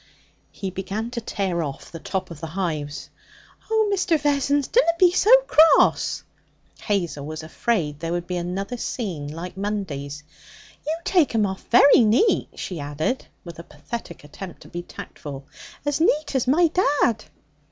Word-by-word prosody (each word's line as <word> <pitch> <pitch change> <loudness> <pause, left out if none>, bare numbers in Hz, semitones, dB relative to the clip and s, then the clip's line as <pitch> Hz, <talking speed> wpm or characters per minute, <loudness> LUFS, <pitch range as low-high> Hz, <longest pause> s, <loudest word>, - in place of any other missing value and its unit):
He 190 -2 -5
began 200 +5 -4
to 240 -1 -4
tear 190 -5 -2
off 140 -4 -6
the 165 - -7
tops 185 +1 -4
of 160 - -9
the 165 - -4
hives. 155 -4 -4 0.6
'Oh, 440 -1 +3
Mr. 360 -4 +2
Vessons, 285 -1 +1
dunna 470 -8 +4
be 360 0 +6
so 375 +3 +2 0.2
cross!' 320 -8 +4 0.6
Hazel 175 -9 -1
was 155 +2 -6
afraid 160 -4 -1
there 165 +1 -3
would 175 0 -2
be 180 - -4
another 190 +7 -3
scene 185 - -4
like 165 +4 -7
Monday's. 155 -8 -4 0.6
'You 315 +1 0
take 335 -10 +2
'em 215 -2 +3
off 190 -1 -5
very 275 +5 +7
neat,' 230 - +3
she 180 -4 -5
added, 145 - -2 0.2
with 170 -1 -9
a - - -7
pathetic 225 -4 -8
attempt 170 +5 -10
to - - -13
be 175 - -5
tactful 145 -5 -9 0.4
'as 290 +1 0
neat 300 -2 +2
as 260 -2 0
my 320 +7 +5
dad.' 285 - +1
195 Hz, 160 wpm, -23 LUFS, 165-275 Hz, 0.6 s, very